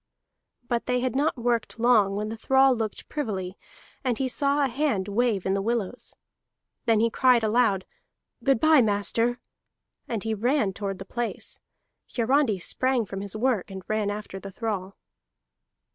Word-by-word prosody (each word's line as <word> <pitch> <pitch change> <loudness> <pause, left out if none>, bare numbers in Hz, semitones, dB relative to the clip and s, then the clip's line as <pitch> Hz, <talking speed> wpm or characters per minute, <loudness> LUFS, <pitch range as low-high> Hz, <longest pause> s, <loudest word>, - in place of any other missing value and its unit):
But 235 -1 -1
they 250 0 +1
had 255 0 -1
not 285 +1 +1
worked 235 -1 -1
long 225 -4 +4
when 210 +1 -2
the 225 - -4
thrall 265 +3 +4
looked 220 -3 -4
privily, 195 -10 -3 0.5
and 250 -4 0
he 265 - 0
saw 280 +2 +2
a - - +1
hand 255 -7 -1
wave 210 -2 0
in 190 - +1
the 195 - 0
willows. 230 +1 -3 0.7
Then 225 -3 +3
he 230 0 +2
cried 250 -1 +4
aloud: 215 -4 +2 0.6
"Good 270 -4 +3
bye, 310 +1 +6
master," 230 +3 +1 0.7
and 225 -4 -3
he 225 0 -1
ran 220 -1 +1
toward 195 -1 -4
the 195 - -8
place. 240 +3 -5 0.6
Hiarandi 245 -2 +2
sprang 255 +6 0
from 195 0 -6
his 200 +1 -6
work, 225 -4 0
and 190 -1 -8
ran 215 -1 0
after 205 -2 -5
the 195 - -8
thrall. 195 -2 -4
225 Hz, 160 wpm, -26 LUFS, 200-250 Hz, 0.7 s, bye